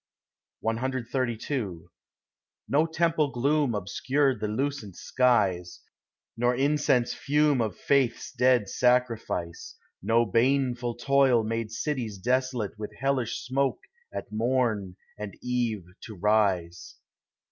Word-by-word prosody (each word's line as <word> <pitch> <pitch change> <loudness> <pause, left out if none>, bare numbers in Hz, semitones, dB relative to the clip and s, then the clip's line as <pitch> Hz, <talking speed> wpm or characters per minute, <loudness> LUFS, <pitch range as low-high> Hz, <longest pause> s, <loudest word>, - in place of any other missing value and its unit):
CXXXII 120 - -2 0.9
No 150 +4 +2
temple 160 -2 +1
gloom 140 0 +1
obscured 130 +8 0
the 105 - -2
lucent 115 -3 -3
skies, 100 -9 +1 0.6
Nor 120 +1 +1
incense 135 -2 +2
fume 145 -2 +2
of 110 -4 -2
faith's 135 -4 +1
dead 125 -4 +3
sacrifice, 115 -9 0 0.2
No 115 +1 +3
baneful 120 +1 +1
toil 130 -2 +3
made 115 0 -2
cities 115 -3 -3
desolate 125 -1 -1
With 105 - -6
hellish 135 -4 -1
smoke 135 +1 0 0.3
at - - -6
morn 110 -4 0 0.2
and 105 -2 -6
eve 120 -6 -1 0.2
to 110 - -9
rise. 95 -4 0
120 Hz, 105 wpm, -27 LUFS, 110-135 Hz, 0.9 s, dead